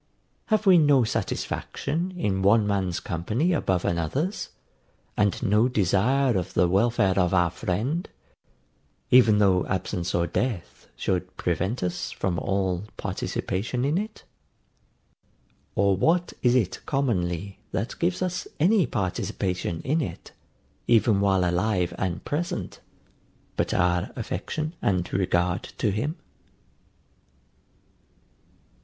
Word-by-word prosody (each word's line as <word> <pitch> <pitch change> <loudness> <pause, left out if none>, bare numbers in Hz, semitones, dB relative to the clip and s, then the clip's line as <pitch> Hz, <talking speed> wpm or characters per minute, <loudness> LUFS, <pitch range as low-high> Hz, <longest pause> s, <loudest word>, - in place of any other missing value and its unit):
Have 215 -1 +1
we 185 -3 +7
no 145 -4 +5
satisfaction 165 +9 -2
in 95 - 0
one 105 +3 +4
man's 95 -4 0
company 110 - -1
above 95 - 0
another's, 110 - -1 0.7
and 105 +1 +1
no 110 +1 +4
desire 125 +4 +2
of 90 -1 -2
the 90 - +4
welfare 100 0 +2
of 90 0 +2
our 90 -2 +3
friend, 120 - -2 1.0
even 115 -4 +6
though 95 -3 +4
absence 95 -1 -2
or 85 0 +2
death 100 +2 -3
should 90 0 -2
prevent 95 +7 -1
us 90 0 -2
from 90 -2 -2
all 95 -1 -1
participation 115 +7 -2
in 150 +6 +1
it? 215 +1 -6 1.5
Or 100 0 +3
what 170 - +1
is 125 0 +3
it 110 -8 +1
commonly, 100 - -1
that 110 +6 -3
gives 175 +2 0
us 180 -1 -3
any 185 - +4
participation 95 -4 -2
in 155 +5 +1
it, 140 - -6 0.6
even 110 -3 +4
while 95 -2 +3
alive 90 0 0
and 85 -3 -2
present, 170 +4 -3 0.8
but - - 0
our 90 +1 +1
affection 130 - -4
and 90 -3 0
regard 90 -1 +1 0.2
to 105 - +1
him? 125 - -2
100 Hz, 115 wpm, -26 LUFS, 90-130 Hz, 1.5 s, we